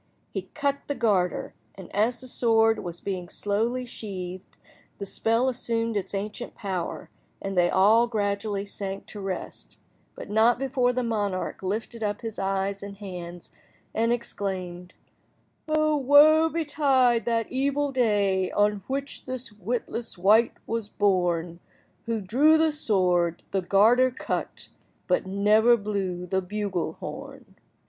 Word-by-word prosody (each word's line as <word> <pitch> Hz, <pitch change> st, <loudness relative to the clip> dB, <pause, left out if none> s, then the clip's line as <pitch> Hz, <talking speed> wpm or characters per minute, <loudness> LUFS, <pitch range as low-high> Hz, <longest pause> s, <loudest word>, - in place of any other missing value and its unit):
He -, -, -5 dB
cut 280 Hz, -2 st, 0 dB
the 285 Hz, -, -2 dB
garter, 190 Hz, -8 st, 0 dB, 0.2 s
and, 190 Hz, -1 st, -11 dB
as 230 Hz, +4 st, +1 dB
the 255 Hz, -, -9 dB
sword 225 Hz, -2 st, +3 dB
was 175 Hz, -1 st, -6 dB
being 185 Hz, -3 st, -4 dB
slowly 230 Hz, +5 st, -1 dB
sheathed, 185 Hz, -5 st, -7 dB, 0.4 s
the 200 Hz, -, -5 dB
spell 230 Hz, +5 st, +1 dB
assumed 230 Hz, -3 st, -1 dB
its 195 Hz, 0 st, -2 dB
ancient 210 Hz, +4 st, -5 dB
power, 185 Hz, -5 st, -4 dB, 0.3 s
and 195 Hz, 0 st, -4 dB
they 175 Hz, -1 st, +4 dB
all 220 Hz, +5 st, +5 dB
gradually 205 Hz, -2 st, -1 dB
sank 195 Hz, -1 st, -5 dB
to 210 Hz, -, -9 dB
rest, 195 Hz, -2 st, -6 dB, 0.4 s
but -, -, -8 dB
not 220 Hz, +3 st, +4 dB
before 260 Hz, -1 st, +1 dB
the 250 Hz, 0 st, -1 dB
monarch 205 Hz, -5 st, -2 dB
lifted 220 Hz, +4 st, -4 dB
up 205 Hz, -1 st, -2 dB
his 225 Hz, -2 st, -6 dB
eyes 195 Hz, 0 st, -1 dB
and 200 Hz, 0 st, -8 dB
hands, 175 Hz, -3 st, -8 dB, 0.4 s
and 230 Hz, +1 st, +1 dB
exclaimed— 185 Hz, -6 st, -3 dB, 0.7 s
"O 310 Hz, 0 st, +2 dB
woe 300 Hz, +4 st, +6 dB
betide 275 Hz, -7 st, +2 dB
that 230 Hz, -2 st, 0 dB
evil 280 Hz, +2 st, 0 dB
day 205 Hz, -7 st, +2 dB
On 205 Hz, 0 st, +2 dB
which 275 Hz, +1 st, -4 dB
this 255 Hz, -2 st, -5 dB
witless 225 Hz, +2 st, -4 dB
wight 215 Hz, +6 st, +4 dB
was 225 Hz, -2 st, -3 dB
born 175 Hz, -5 st, 0 dB, 0.5 s
Who 225 Hz, -2 st, -1 dB
drew 275 Hz, +11 st, +4 dB
the 320 Hz, 0 st, +3 dB
sword—the 185 Hz, -, +1 dB
garter 220 Hz, +8 st, +4 dB
cut, 255 Hz, -, -4 dB, 0.4 s
But 180 Hz, 0 st, 0 dB
never 210 Hz, +5 st, +4 dB
blew 195 Hz, -4 st, -3 dB
the 190 Hz, +1 st, 0 dB
bugle–horn." 195 Hz, -1 st, -5 dB
210 Hz, 135 wpm, -26 LUFS, 190-240 Hz, 0.7 s, woe